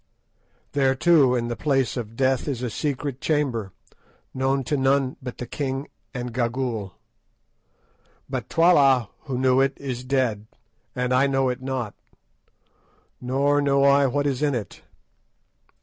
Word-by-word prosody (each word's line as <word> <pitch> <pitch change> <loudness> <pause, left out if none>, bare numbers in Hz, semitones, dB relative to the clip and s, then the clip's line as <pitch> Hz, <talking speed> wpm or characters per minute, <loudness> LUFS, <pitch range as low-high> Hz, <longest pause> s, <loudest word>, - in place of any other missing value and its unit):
There, 135 -2 +2
too, 140 -4 +4
in 120 -1 -1
the 120 - -3
Place 135 -2 0
of 115 -3 -5
Death 130 +1 +1
is 130 -4 -3
a 120 - -2
secret 140 -1 -3
chamber, 130 -10 -1 0.6
known 135 +1 0
to 145 - -1
none 135 -1 +1
but 125 - -7
the 125 - -5
king 135 +1 -4 0.2
and 125 -2 -5
Gagool. 120 -5 -2 1.3
But - - -4
Twala, 140 - +4 0.2
who 135 -4 -3
knew 130 0 +3
it, 135 0 +2
is 130 -3 -5
dead, 125 -5 -1 0.5
and 125 0 0
I 130 +2 +4
know 135 -1 +1
it 125 +1 -4
not, 130 -5 -3 1.3
nor 140 +3 +1
know 140 -1 +2
I 140 0 +5
what 145 +3 -1
is 135 -2 -1
in 145 -3 +1
it. 105 -4 -6
130 Hz, 145 wpm, -24 LUFS, 125-140 Hz, 1.3 s, I